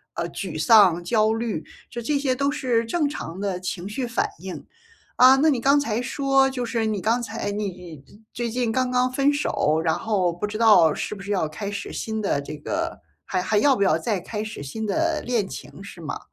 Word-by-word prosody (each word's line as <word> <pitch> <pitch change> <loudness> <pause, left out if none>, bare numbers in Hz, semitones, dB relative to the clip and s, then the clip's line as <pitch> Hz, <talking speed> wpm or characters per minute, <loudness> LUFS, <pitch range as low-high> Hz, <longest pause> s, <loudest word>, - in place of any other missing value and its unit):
呃， - - -2
沮 - - -5
丧、 190 -7 +6
焦 215 +3 +2
虑， 225 -7 -3 0.3
就 240 - -5
这 285 +5 0
些 275 -2 +1
都 280 +2 0
是 245 -4 0
正 295 +6 0
常 190 - -6
的 195 -3 -2
情 185 0 -5
绪 245 +4 -3
反 235 - 0
应。 185 +1 -8 0.5
啊， 255 +1 +8
那 300 +3 +4
你 255 -4 -1
刚 280 +3 +4
才 230 -5 -1
说 270 +1 +2
就 250 -2 -3
是 230 -2 -1
你 210 -2 -1
刚 230 +4 +1
才 225 -2 -4
你 180 -8 -6 0.3
最 235 -1 -2
近 240 -1 -1
刚 255 +1 0
刚 250 0 +1
分 275 +2 +3
手， 160 - 0
然 160 - +3
后 190 -6 0
不 175 +5 -3
知 210 +1 -5
道 210 -8 +6
是 - - -4
不 200 - -9
是 200 - -9
要 190 -6 +1
开 155 +7 -6
始 200 0 -5
新 220 -1 -3
的 195 -9 0
这 150 +2 -7
个 330 - -3 0.3
还 185 - -1
还 215 - +1
要 275 +3 +4
不 200 - +1
要 185 -5 +3
再 210 +1 -1
开 210 +4 -5
始 215 -8 -7
新 215 +11 -5
的 325 +8 0
恋 235 -5 -1
情， 195 - -9
是 190 -3 -11
吗？ 155 - -5
220 Hz, 235 characters per minute, -24 LUFS, 190-255 Hz, 0.5 s, 啊